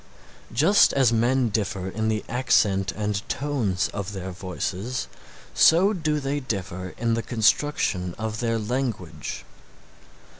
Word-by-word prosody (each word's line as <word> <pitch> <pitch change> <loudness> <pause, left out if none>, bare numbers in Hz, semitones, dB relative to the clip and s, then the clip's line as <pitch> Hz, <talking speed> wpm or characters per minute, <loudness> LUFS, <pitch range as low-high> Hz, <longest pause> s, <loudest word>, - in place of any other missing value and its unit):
Just 160 - +5
as 130 -4 +3
men 120 +2 +2
differ 100 -3 -2
in 110 +3 -2
the 110 -1 -1
accent 105 -6 +2
and 105 -1 -2
tones 115 -10 0
of 100 0 -4
their 95 -1 -5
voices, 95 +6 -4 0.5
so 185 +6 +5
do 155 -5 -1
they 140 +1 -2
differ 95 -7 -5
in 115 0 0
the 115 - 0
construction 110 - +1
of 110 0 -4
their 115 -1 0
language. 105 - -4
110 Hz, 125 wpm, -25 LUFS, 95-130 Hz, 0.5 s, Just